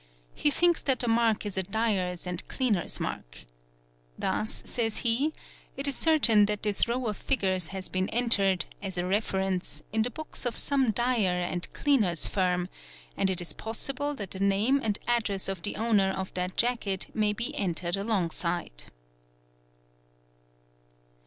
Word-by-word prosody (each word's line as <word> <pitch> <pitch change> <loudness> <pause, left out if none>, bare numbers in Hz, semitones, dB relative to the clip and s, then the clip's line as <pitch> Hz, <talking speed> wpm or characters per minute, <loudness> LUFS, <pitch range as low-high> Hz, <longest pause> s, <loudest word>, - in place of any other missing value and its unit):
He 295 - +1
thinks 345 +3 +2
that 265 -3 +1
the 245 - -2
mark 225 -2 +2
is 195 -2 -2
a - - +4
dyer's 190 -3 -1
and 180 0 -4
cleaner's 225 -9 0
mark. - - -6 0.7
Thus, 215 - -1
says 225 -3 -1
he, 250 +7 +3 0.5
it 275 +1 +1
is 280 - +2
certain 240 -10 +5
that 210 -1 -3
this 210 0 +2
row 245 +2 -2
of 210 -3 -2
figures 190 -9 0
has 190 -1 -6
been 185 0 -2
entered, 205 -6 +3 0.2
as 190 -3 -5
a 175 - -1
reference, 190 -1 -2
i 220 - +1
the 235 - 0
books 315 +6 -5
of 235 - -2
some 270 -4 +3
dyer 220 -5 +1
and 175 0 -3
cleaner's 215 - +2
firm; 180 -2 0 0.5
and 190 - +1
it 185 -1 +1
is 175 - 0
possible 275 +6 0
that 200 -7 -7
the" 190 - -5
name 200 +8 +2
and 210 -4 0
address 220 -5 0
of 195 -3 -4
the 205 - -2
owner 210 -3 +2
of 190 0 -4
that 180 0 -3
jacket 230 -6 0
may 215 -1 +2
be 235 +3 -3
entered 175 -2 -1
alongside. 175 - -2
205 Hz, 160 wpm, -28 LUFS, 185-235 Hz, 0.7 s, certain